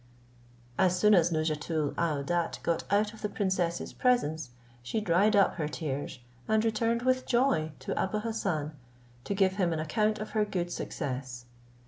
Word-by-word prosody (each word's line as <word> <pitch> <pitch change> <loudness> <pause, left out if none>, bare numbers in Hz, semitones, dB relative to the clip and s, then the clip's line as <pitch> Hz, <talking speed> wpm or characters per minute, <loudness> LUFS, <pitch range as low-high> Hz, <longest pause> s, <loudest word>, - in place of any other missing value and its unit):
As 185 -1 +3
soon 210 +2 +5
as 175 -3 +4
Nouzhatoul 155 -1 -1
aouadat 165 +1 -1
got 170 +1 -1
out 210 +2 +2
of 220 - -13
the 210 - -2
princess's 185 -4 -1
presence, 160 - +1 0.3
she 125 - -2
dried 205 +2 +3
up 200 -2 +4
her 155 -4 -1
tears, 145 -4 -4 0.3
and 220 +1 +2
returned 230 +2 +1
with 255 0 +1
joy 240 - +2
to - - -3
Abou 190 +3 -1
Hassan, 195 -10 -2 0.5
to 200 - -2
give 190 0 +2
him 180 -4 +2
an 160 - -1
account 215 +7 +1
of 215 +1 -6
her 215 -1 +2
good 180 -4 -2
success. 130 -7 -5
180 Hz, 160 wpm, -29 LUFS, 155-215 Hz, 0.5 s, soon